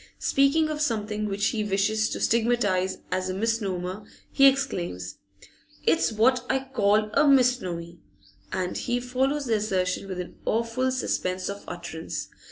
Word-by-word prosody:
Speaking 280 +3 +3
of 305 -1 -3
something 215 -5 -1
which 205 0 0
he 215 -2 -1
wishes 210 +2 +1
to - - -4
stigmatise 220 -5 +1
as 185 0 -1
a 185 - -2
misnomer, 195 -3 -2 0.3
he 275 - +6
exclaims: 180 - -1 0.7
'It's 160 +8 +3
what 245 +3 +3
I 265 0 0
call 210 -1 +2
a 295 - +4
misnomy!' 190 -11 +2 0.5
And 180 -1 -2
he 245 -1 -1
follows 265 +4 -1
the 225 -3 +2
assertion 190 -2 -1
with 185 -2 -5
an 180 - -7
awful 230 +3 0
suspense 185 -8 -1
of 200 - -9
utterance. 170 -2 -6
215 Hz, 145 wpm, -26 LUFS, 185-250 Hz, 0.7 s, he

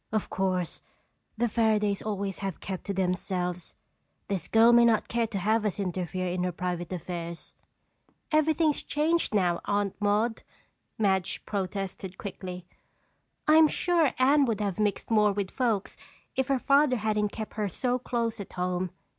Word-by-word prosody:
Of 215 -1 -1
course, 185 -2 -1 0.6
the 240 +2 +2
Fairadays 215 -3 +1
always 200 -2 -3
have 195 -4 -4
kept 190 -2 -6
to 200 - -2
themselves. 180 -1 -2 0.5
This 185 -4 -2
girl 225 +1 +6
may 240 0 +7
not 230 -2 +3
care 235 -1 0
to 215 -3 -4
have 215 +4 +1
us 210 -1 -2
interfere 185 -1 -2
in 180 0 -2
her 180 - 0
private 175 0 -4
affairs." 170 -1 -6 0.8
"Everything 310 0 +3
is - - -4
changed 320 +3 +1
now, 175 -4 +2
Aunt 205 -1 0
Maude," 210 +3 +1 0.6
Madge 190 -4 0
protested 195 -1 -4
quickly. 180 -2 -7 0.8
"I'm 310 +1 +7
sure 335 -2 +2
Anne 275 +2 +5
would 225 -4 -1
have 200 -2 -2
mixed 210 +1 -1
more 210 -2 +4
with 195 -1 -3
folks 230 -6 -1 0.4
if 265 -1 0
her 275 -1 +2
father 275 +1 +4
hadn't 210 -2 0
kept 220 -1 -6
her 210 -2 -1
so 250 +7 -1
close 235 -3 -2
at 200 - -8
home. 180 0 -1
205 Hz, 155 wpm, -28 LUFS, 185-235 Hz, 0.8 s, may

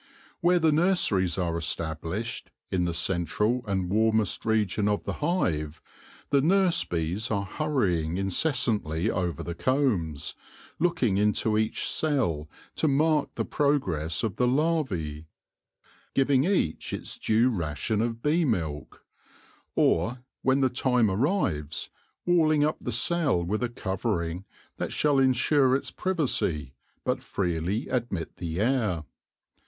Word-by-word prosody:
Where 180 +1 +4
the 160 -2 +3
nurseries 150 - +2
are 85 -3 -1
established, 85 +8 -3 0.2
in 90 -2 +1
the 85 - -1
central 100 +8 0
and 95 -2 -1
warmest 110 -1 +1
region 105 -2 +1
of 105 0 0
the - - -3
hive, 85 - 0 0.5
the 140 -1 +4
nurse 185 +3 +4
bees 85 +7 -2
are 100 -2 -1
hurrying 95 - 0
in 95 0 -1
cessantly 110 - 0
over 90 -3 -2
the 85 - -4
combs, 100 - 0 0.5
looking 160 - +1
into 105 +1 +1
each 110 0 0
cell 110 - 0 0.3
to 160 - +2
mark 150 +1 +2
the - - -1
progress 85 - 0
of 110 -5 -2
the 125 - +2
larvae; 125 - -1 0.9
giving 135 0 +3
each 180 - 0
its - - -5
due 115 +4 +3
ration 90 - -1
of 115 0 -3
bee 160 +4 +2
milk; 80 - -3 0.7
or, 120 +10 +1 0.2
when 135 +1 +2
the 130 - +3
time 125 -4 +2
arrives, 95 - -1 0.4
walling 155 -4 +3
up 155 +1 +1
the 125 - -3
cell 135 - +1
with 105 +6 -2
a 125 - 0
covering 90 -4 -3 0.3
that - - -3
shall 145 -2 +2
insure 130 +1 +3
its 140 - -2
privacy, 110 - 0 0.3
but - - 0
freely 90 +3 -2
admit 115 -10 -3
the 85 -1 -4
air. 110 - +1
110 Hz, 130 wpm, -27 LUFS, 85-140 Hz, 0.9 s, Where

